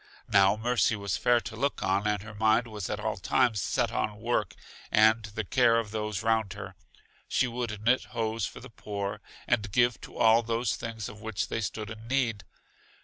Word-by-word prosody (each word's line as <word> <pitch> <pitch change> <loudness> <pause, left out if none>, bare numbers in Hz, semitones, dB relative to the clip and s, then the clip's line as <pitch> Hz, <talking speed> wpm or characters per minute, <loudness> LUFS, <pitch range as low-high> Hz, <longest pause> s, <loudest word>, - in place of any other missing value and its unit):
Now 100 +1 +5
Mercy 120 0 +2
was 100 -3 -2
fair 120 0 +3
to 105 +2 -7
look 140 -1 -1
on 95 +2 +1
and 105 -2 0
her 110 0 -9
mind 110 +2 +3
was 105 -4 -6
at 105 - -2
all 110 +1 -2
times 115 +2 +2
set 120 +3 0
on 105 -2 -2
work 120 +2 -1 0.4
and 110 0 +5
the 110 +1 -4
care 115 +3 +3
of 110 -3 -2
those 105 -2 -3
round 110 -3 +1
her. 95 - -8 0.5
She - - +2
would 120 -3 -4
knit 125 +3 +3
hose 110 -2 -2
for - - -10
the - - -11
poor, 100 -1 -5 0.2
and 110 -4 0
give 120 +1 +2
to - - -11
all 115 +1 +5
those 115 +1 -1
things 115 -2 -5
of 105 - -10
which 105 -8 -3
they 115 - -2
stood 110 0 -4
in 110 +1 -9
need. 115 -7 0
110 Hz, 200 wpm, -28 LUFS, 105-115 Hz, 0.5 s, Now